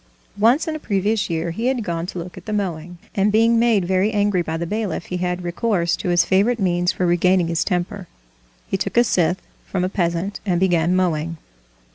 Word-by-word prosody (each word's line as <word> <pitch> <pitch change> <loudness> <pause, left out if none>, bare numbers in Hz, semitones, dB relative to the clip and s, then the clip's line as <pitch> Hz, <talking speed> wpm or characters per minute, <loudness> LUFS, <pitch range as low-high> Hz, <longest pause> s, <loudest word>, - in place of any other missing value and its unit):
Once 240 +10 +3
in 315 - -2
a - - -5
previous 205 -3 0
year 165 0 -2
he 225 +8 -2
had 255 -3 0
gone 170 -2 -3
to 185 - -7
look 175 +1 -7
at 185 - -12
the - - -3
mowing, 175 -4 -3 0.2
and 200 +1 +2
being 230 +2 +4
made 225 -6 +3
very 190 +3 +1
angry 205 -3 +1
by 160 -1 -3
the 170 - -3
bailiff 210 +2 -3
he 180 - -4
had 180 0 -2
recourse 175 -1 0
to - - -4
his 175 -1 +3
favorite 210 +5 +2
means 175 -2 +1
for 180 - -2
regaining 175 0 +2
his 165 -1 +1
temper,—he - - -5
took 200 - -3
a 240 - +7
scythe 180 -5 +1 0.2
from 185 -2 -2
a 185 - 0
peasant 175 +1 -1
and 180 -4 0
began 175 -1 +2
mowing. 165 -3 0
180 Hz, 205 wpm, -21 LUFS, 170-205 Hz, 0.2 s, a